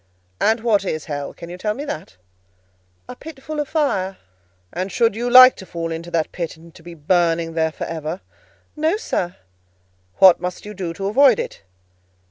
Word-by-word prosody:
"And 220 +1 +2
what 220 -4 +2
is 155 -5 -3
hell? 145 -3 -4
Can 170 - -11
you 180 - -8
tell 210 +2 -1
me 285 - -5
that?" 155 - -7 0.9
"A 250 - -8
pit 280 -1 -11
full 305 +1 -5
of 295 - -1
fire." 195 - 0 0.6
"And 185 +2 -3
should 230 -2 +2
you 240 +2 -2
like 255 +1 +9
to 190 - -10
fall 165 -1 -4
into 165 +1 -5
that 165 -2 -1
pit, 170 -2 -5
and 165 0 -16
to - - -16
be 170 +1 -11
burning 165 +1 +1
there 160 -1 0
for - - -7
ever?" 160 +2 -5 0.5
"No, 315 +6 +1
sir." 180 - -3 0.8
"What 185 -3 +7
must 180 +2 -5
you 210 - -7
do 185 -4 -4
to 195 - -5
avoid 250 +3 +5
it?" - - -5
185 Hz, 190 wpm, -21 LUFS, 165-240 Hz, 0.9 s, like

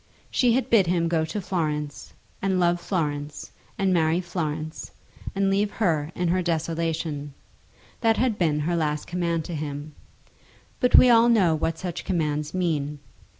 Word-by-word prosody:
She 245 -2 +3
had 260 +1 0
bid 205 -6 +5
him 170 -1 +1
go 165 -1 +1
to 160 +6 -4
Florence, 150 -6 -3 0.3
and 190 -1 +1
love 175 0 +2
Florence, 150 -5 -3 0.3
and 190 -1 +2
marry 165 0 +2
Florence, 155 -3 -4 0.5
and 195 0 +2
leave 200 +1 +2
her 160 -7 0
in 175 -1 0
her 185 +2 +2
desolation. 160 -3 -2 0.6
That 225 -2 +2
had 245 -4 +1
been 155 -4 +1
her 170 +3 0
last 150 -2 -1
command 170 -2 -1
to 175 - -6
him. 150 0 -5 0.9
But 250 - +4
we 250 - +8
all 235 0 +6
know 195 -8 +4
what 160 +1 -1
such 175 -1 -5
commands 150 -4 -1
mean. 155 -5 -1
170 Hz, 155 wpm, -25 LUFS, 155-185 Hz, 0.9 s, we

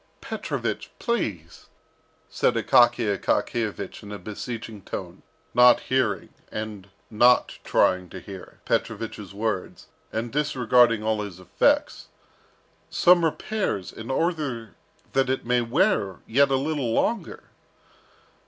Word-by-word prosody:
"Petrovich, - - -4
please," 100 - -3 0.6
said - - +1
Akaky 120 -1 +4
Akakiyevich 105 0 -2
in 105 - -10
a 105 - -5
beseeching 110 0 -7
tone, - - -7 0.3
not 125 0 +7
hearing, 125 -7 0 0.2
and 105 -3 -6 0.2
not 120 +3 +4
trying 90 -1 +2
to 95 - -8
hear, 95 +1 -11
Petrovich's 105 -4 -2
words, 105 -1 -4 0.2
and 115 +1 -3
disregarding 125 -6 +3
all 110 -1 0
his 100 -4 -7
"effects," 95 - +1 0.8
"some 175 -1 +5
repairs, 165 - -2
in 110 +2 -9
order 135 - -2 0.4
that 135 -1 +2
it 130 - -1
may 125 0 +2
wear 120 - +1
yet 140 +4 +3
a 135 - +2
little 140 -3 -1
longer." 200 - -1
115 Hz, 115 wpm, -25 LUFS, 105-135 Hz, 0.8 s, not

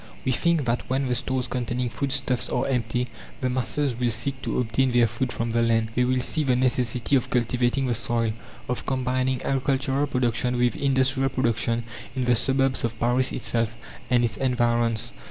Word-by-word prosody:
We 130 - +2
think 165 +3 +1
that 120 0 -1
when 135 +1 0
the 125 - 0
stores 130 +1 -1
containing 125 0 -2
food 140 +3 -3
stuffs 125 -1 0
are - - 0
empty, 125 -1 -1 0.3
the 130 -1 -1
masses 130 +2 0
will 120 +1 0
seek 130 +4 0
to - - -2
obtain 125 +2 +1
their 120 -1 +5
food 120 +3 -2
from 115 0 -3
the 115 +1 +1
land. 115 -1 +2
They 125 +1 +2
will 130 0 +1
see 155 - +3
the 130 -3 +2
necessity 125 0 +2
of 130 - +1
cultivating 125 +2 +1
the 125 - 0
soil, 115 -1 0 0.3
of 125 - -3
combining 130 0 0
agricultural 135 +1 0
production 125 -2 0
with 120 0 +2
industrial 135 -1 +1
production 120 -2 0 0.3
in 130 -1 -1
the 125 - +4
suburbs 135 +2 +1
of 115 -1 -3
Paris 125 +2 +2
itself 115 -2 -1 0.3
and 120 -1 +3
its 115 - -3
environs. 120 -3 0
125 Hz, 185 wpm, -25 LUFS, 120-130 Hz, 0.3 s, their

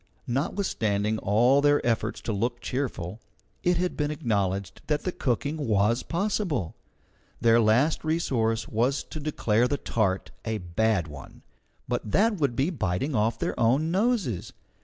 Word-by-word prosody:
Notwithstanding 110 - 0
all 120 +7 +4
their 145 0 +4
efforts 115 -2 0
to 110 - -3
look 120 +4 -1
cheerful, 115 -7 -3 0.4
it 180 0 +2
had 180 -1 -2
to 150 - +2
be - - -3
acknowledged 100 - -1
that 150 -1 0
the 185 - -1
cooking 145 +1 -1
was 115 -3 +2
possible. 175 - -1 0.6
Their 115 0 +5
last 120 +8 +3
resource 120 -9 0
was 125 +6 0
to 155 - -8
declare 125 -6 +1
the 145 - -1
tart 100 -7 -1
a 110 -1 -2
bad 95 0 0
one, 75 -3 -11 0.4
but - - -1
that 215 +1 +3
would 140 -7 0
be 140 +8 +1
biting 115 - -1
off 110 0 +1
their - - -2
own 135 +8 +2
noses. 195 - 0
120 Hz, 150 wpm, -27 LUFS, 110-150 Hz, 0.6 s, Their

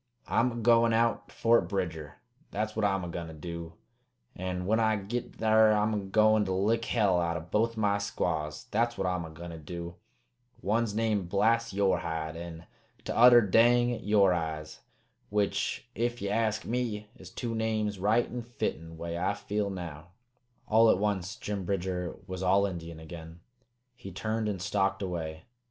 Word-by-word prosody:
"I'm 125 +2 +2
a - - -7
goin' 115 0 +4
out 115 +1 +1
to - - -18
Fort 115 +1 +3
Bridger, 85 -6 -3 0.3
that's 110 +1 -3
what 110 - -1
I'm 95 -2 +1
a - - -4
goin' 85 -1 -5
to 80 - -9
do; 85 +1 -7 0.6
an' 90 0 -3
when 110 +4 +2
I 110 -1 +3
git 110 +4 -4
thar 110 0 +5
I'm 105 +1 +1
a 105 - 0
goin' 110 +2 +3
to 95 - -1
lick 110 +5 +1
hell 100 -6 +2
out 85 0 -1
o' - - -5
both 110 +7 0
my 100 -2 +2
squaws, 80 -6 -2
that's 120 +2 +1
what 95 - -1
I'm 90 -2 -1
a - - -8
goin' 85 +2 -9
to 80 - -8
do! 85 +2 -7 0.7
One's 110 +1 0
named 105 -5 0
Blast 115 +4 +2
Yore 100 -1 +2
Hide, 80 0 -4
an' 85 0 -8 0.4
t'other 120 0 +7
Dang 120 +3 +4
Yore 100 -3 +4
Eyes. 80 -2 -4 0.5
Which, 100 +2 -1
ef 120 +1 -1
ye 100 - -3
ask 110 -1 0
me, 110 -3 -3
is - - -12
two 120 -2 -4
names 110 -3 -1
right 110 +5 +3
an' 125 - -5
fitten, 80 -8 -4
way 85 +1 -4
I 95 +3 0
feel 105 0 -2
now." 85 -4 -7 0.6
All 115 +1 +5
at - - +5
once 100 -1 -1
Jim 100 -2 -4
Bridger 90 -1 -2
was 95 -1 -6
all 95 +2 +4
Indian 85 -4 -6
again. 80 +1 -10 0.5
He 95 -5 -10
turned 110 +3 -2
and 100 -3 -3
stalked 100 +1 0
away. 80 -4 -4
100 Hz, 175 wpm, -29 LUFS, 85-110 Hz, 0.7 s, t'other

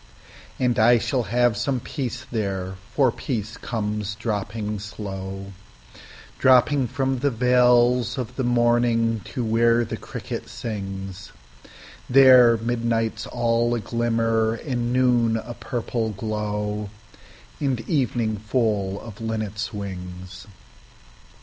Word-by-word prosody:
And 125 -2 +1
I 120 +2 +6
shall 125 +3 0
have 120 0 +3
some 130 +4 -1
peace 130 -1 -5
there, 95 -5 -2 0.2
for 135 -4 +4
peace 115 -3 -4
comes 105 -3 -3
dropping 105 -1 -3
slow, 95 -1 -7 0.9
Dropping 130 +1 +4
from 135 +2 -1
the 140 +3 +2
veils 125 0 +3
of 125 -4 -4
the 130 - -2
morning 120 -2 +2
to 125 - -4
where 115 +1 +3
the - - -5
cricket - - -7
sings; 95 -3 -6 0.8
There 125 -3 +7
midnight's 115 -1 -1
all 120 0 +1
a - - -1
glimmer, 115 0 0
and 120 -2 -3
noon 120 -3 +3
a 120 +2 -6
purple 120 -2 -3
glow, 105 0 -3 0.7
And 135 -5 0
evening 120 -7 0
full 105 -3 0
of 110 -3 -10
the 115 - -6
linnet's 110 -1 -3
wings. 95 -2 -7
115 Hz, 115 wpm, -24 LUFS, 105-120 Hz, 0.9 s, There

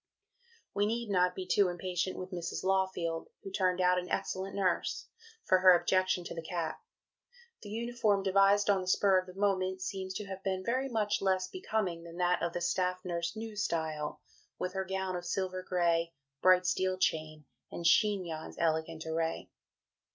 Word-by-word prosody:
" 465 -1 -33
We 205 +1 +2
need 230 -1 -2
not 180 -1 +3
be 185 - -4
too 200 +1 +3
impatient 180 +1 -2
with 185 +1 -6
Mrs. 175 -2 -4
Lawfield 185 -4 0 0.2
(who 195 - -7
turned 185 -2 +1
out 180 0 +4
an 180 - -7
excellent 190 +1 -2
nurse) 190 -3 0 0.4
for 185 - +4
her 185 -1 +7
objection 185 -1 +1
to - - -6
the 165 - -5
cap. 170 - -4 0.8
The 205 - -9
uniform, 225 -2 0
devised 195 +1 +4
on 200 -2 +3
the 185 - -7
spur 190 0 +4
of 185 - -7
the 180 - -11
moment, 190 -2 +1
seems 190 -1 -4
to 210 - -4
have 190 -1 -7
been 190 -1 -1
very 260 +3 0
much 210 -3 0
less 190 -1 +1
becoming 215 - -2
than 170 0 -10
that 180 0 +2
of 170 0 -1
the 175 - -3
"Staff 180 +1 0
Nurse, 170 +1 -2
New 220 0 -6
Style," 160 -6 -2 0.4
with 185 0 -3
her 190 -1 -2
"gown 190 0 -2
of 175 - -4
silver 185 0 -2
gray, 170 -2 +1 0.3
bright 185 0 +5
steel 185 0 +1
chain, 155 -4 -1 0.3
and 170 - -6
chignon's 180 -4 +2
elegant 160 0 -1
array." 160 0 -2
185 Hz, 180 wpm, -32 LUFS, 175-195 Hz, 0.8 s, her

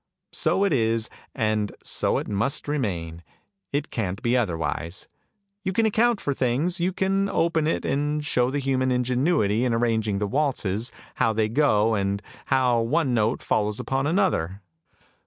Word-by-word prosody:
So 195 - +2
it 200 -5 +2
is, 115 -2 +1 0.2
and 110 -3 0
so - - 0
it - - -3
must 110 +10 -1
remain, 90 - -2 0.5
it 145 +1 -2
can't 100 -4 -2
be 120 +1 +2
otherwise. 85 - -2 0.6
You 190 -1 -1
can 225 +3 +2
account 225 +1 +3
for 145 - -1
things, 135 +8 0
you 175 +2 +1
can 195 +1 0
open 165 -4 +1
it 165 - -1
and 150 +1 -1
show 125 -3 +2
the 140 - -2
human 130 -2 0
ingenuity 125 - +1
in 120 -2 +1
arranging 110 -3 +1
the 105 - 0
waltzes, 120 -4 -1 0.3
how 115 -2 +3
they 110 0 +1
go, 115 -4 +3
and 100 -1 0 0.3
how 125 -3 +3
one 130 +3 +1
note 110 +1 +1
follows 105 0 0
upon 135 +1 -1
another! 145 - 0
125 Hz, 155 wpm, -25 LUFS, 105-150 Hz, 0.6 s, account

